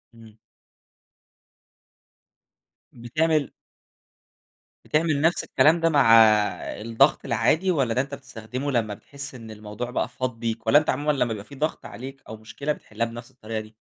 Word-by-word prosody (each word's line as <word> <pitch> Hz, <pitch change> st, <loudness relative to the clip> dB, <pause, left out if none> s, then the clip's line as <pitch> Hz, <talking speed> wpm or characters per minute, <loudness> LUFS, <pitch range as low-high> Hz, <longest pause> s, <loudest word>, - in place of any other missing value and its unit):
إمم. 110 Hz, -1 st, -16 dB, 2.6 s
بتعمل 155 Hz, +5 st, 0 dB, 1.3 s
بتعمل 155 Hz, -2 st, +1 dB
نَفْس 165 Hz, +2 st, +2 dB
الكلام 160 Hz, +3 st, +3 dB
ده 165 Hz, 0 st, +2 dB
مع 140 Hz, -7 st, +5 dB, 0.7 s
الضغط 115 Hz, +6 st, +2 dB
العادي 135 Hz, +10 st, +2 dB
والّا 135 Hz, -8 st, +1 dB
ده 125 Hz, -, +2 dB
أنت 140 Hz, +1 st, -7 dB
بتستخدمه 130 Hz, +1 st, -6 dB
لمّا 115 Hz, -5 st, 0 dB
بتحِس 135 Hz, +5 st, -8 dB
إن 115 Hz, -2 st, -10 dB
الموضوع 105 Hz, +3 st, -7 dB
بقى 125 Hz, -, -2 dB
فاض 125 Hz, -3 st, -4 dB
بيك 115 Hz, -1 st, -4 dB
والّا 145 Hz, +6 st, +7 dB
أنت 155 Hz, -, -4 dB
عمومًا 145 Hz, +3 st, +1 dB
لمّا 140 Hz, -4 st, +1 dB
بيبقى 110 Hz, -4 st, -4 dB
في 140 Hz, -, -12 dB
ضغْط 155 Hz, +3 st, -2 dB
عليك 135 Hz, +2 st, -9 dB
أو 110 Hz, -, -7 dB
مشكلة، 115 Hz, +7 st, -4 dB
بتحلّها 115 Hz, -4 st, -4 dB
بنَفْس 120 Hz, +1 st, -9 dB
الطريقة 110 Hz, 0 st, -5 dB
دي؟ 110 Hz, 0 st, -11 dB
125 Hz, 145 wpm, -24 LUFS, 115-145 Hz, 2.6 s, والّا